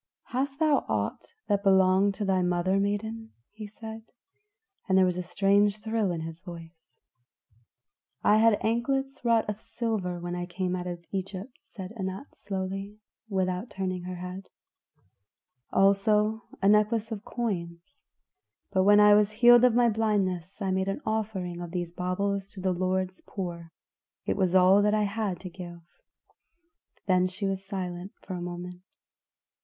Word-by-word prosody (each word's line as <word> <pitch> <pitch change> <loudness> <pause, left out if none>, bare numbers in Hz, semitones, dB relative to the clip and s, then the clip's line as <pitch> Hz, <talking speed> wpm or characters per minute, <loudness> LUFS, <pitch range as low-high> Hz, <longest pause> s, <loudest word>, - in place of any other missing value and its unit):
"Hast 270 +2 -2
thou 310 -2 +3
aught - - -1 0.2
that 200 -1 +1
belonged 190 0 +4
to 205 - -3
thy 190 -1 +2
mother, 180 +2 +1
maiden?" 220 +3 -2 0.2
he 215 0 -8
said, 220 +1 -9 0.9
and 190 - +4
there 190 - +6
was 180 -1 0
a 180 - -2
strange 200 +3 +2
thrill 220 -2 0
in 165 -2 -3
his 165 +1 -7
voice. 165 -3 -12 1.3
"I 210 - +5
had 220 -1 +5
anklets 270 +4 0
of - - -23
wrought 220 -3 +2
silver 215 -8 -3
when 175 0 -4
I 175 0 -4
came 185 0 -2
out 180 0 -4
of 175 -1 -6
Egypt," 195 +5 -5
said 190 -1 -9
Anat 190 +5 -5
slowly, 195 +1 -5 0.3
without 185 +2 -1
turning 185 -1 -3
her 180 0 -5
head; 180 +2 -7 1.2
"also 210 +3 +3 0.2
a - - +5
necklace 215 +2 +3
of 210 -2 -5
coins; 170 -9 -5 0.7
but 190 -2 +2
when 205 +2 +6
I 210 0 +8
was 210 0 +5
healed 240 +3 +6
of 250 -2 +5
my 240 0 +5
blindness 205 -4 -1
I 190 - 0
made 190 0 0
an 195 +8 -2
offering 195 -5 -2
of 175 - -6
these 175 -1 -3
baubles 195 +2 -1
to 195 - -10
the 185 0 0
Lord's 185 +1 -1
poor. 170 -4 -6 0.5
It - - 0
was 190 -2 +1
all 185 +2 +6
that 210 +1 +3
I 215 - +2
had 200 -3 -2
to 185 - -6
give." 175 -1 -9 1.2
Then 185 -1 +3
she 185 +2 -4
was 195 0 -2
silent 185 -1 -5
for 190 - -6
a 180 - -4
moment. 175 +1 -6
195 Hz, 160 wpm, -28 LUFS, 180-215 Hz, 1.3 s, I